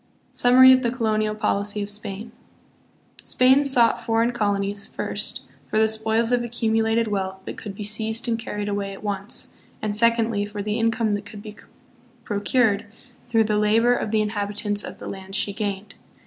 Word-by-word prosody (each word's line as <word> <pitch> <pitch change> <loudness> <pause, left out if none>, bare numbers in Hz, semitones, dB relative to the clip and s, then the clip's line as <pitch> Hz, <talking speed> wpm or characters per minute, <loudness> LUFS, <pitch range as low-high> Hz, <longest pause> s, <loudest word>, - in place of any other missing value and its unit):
Summary 260 +1 +7
of 260 - +3
the 240 - 0
Colonial 215 -3 -1
Policy 205 0 -1
of - - -5
Spain. 205 +2 -4 0.9
Spain 260 +3 +4
sought 250 -5 +4
foreign 230 +1 +1
colonies, 205 -3 -1
first, - - -3 0.2
for - - -2
the 220 0 +4
spoils 220 +1 +1
of 245 -1 +2
accumulated 225 -1 0
wealth 190 -2 -3
that - - -6
could 205 -2 -8
be 210 - -6
seized 220 +3 -3
and 230 -1 0
carried 210 -2 -5
away 200 -1 -3
at 195 - -12
once, 200 -1 -3 0.3
and, 210 -1 -3
secondly, 230 -1 +2
for 205 0 -5
the 210 +2 -2
income 225 -1 +1
that 205 0 -4
could 205 0 -10
be 215 -1 -9 0.7
procured 205 0 +1 0.4
through 225 -2 +3
the 210 -1 0
labor 225 +3 +3
of 245 - -2
the 215 0 +1
inhabitants 205 0 -1
of - - -8
the - - -9
lands 195 +1 -5
she 200 - 0
gained. 200 -1 -4
215 Hz, 175 wpm, -23 LUFS, 205-230 Hz, 0.9 s, Summary